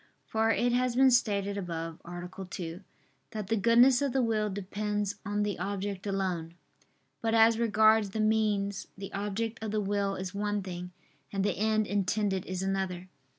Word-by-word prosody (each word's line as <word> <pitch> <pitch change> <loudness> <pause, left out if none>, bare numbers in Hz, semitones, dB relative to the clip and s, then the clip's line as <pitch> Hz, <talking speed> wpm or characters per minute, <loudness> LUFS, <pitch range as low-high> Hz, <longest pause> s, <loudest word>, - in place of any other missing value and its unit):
For 220 0 +1
it 240 +2 +2
has 250 -1 +1
been 265 +1 +6
stated 200 -4 +1
above 165 -3 -5
(A. 180 +2 -7
2) 170 0 -6 0.5
that 210 -3 -5
the 225 - +3
goodness 235 +5 +5
of 280 -3 0
the 265 - +2
will 215 -2 +1
depends 205 +1 -2
on 205 -1 -1
the 205 -4 -2
object 200 +1 -3
alone. 180 -4 -2 0.7
But 225 0 +1
as 225 0 +5
regards 220 -2 +4
the 220 - -4
means, 210 -2 +1
the 195 0 -7
object 210 +3 -3
of 220 - -2
the 215 +1 0
will 200 -1 0
is 185 0 -5
one 205 0 -1
thing, 180 -1 -6 0.4
and 195 -1 -1
the - - +1
end 215 0 +1
intended 200 -1 0
is 185 0 -3
another. 190 -2 -2
205 Hz, 170 wpm, -30 LUFS, 190-220 Hz, 0.7 s, been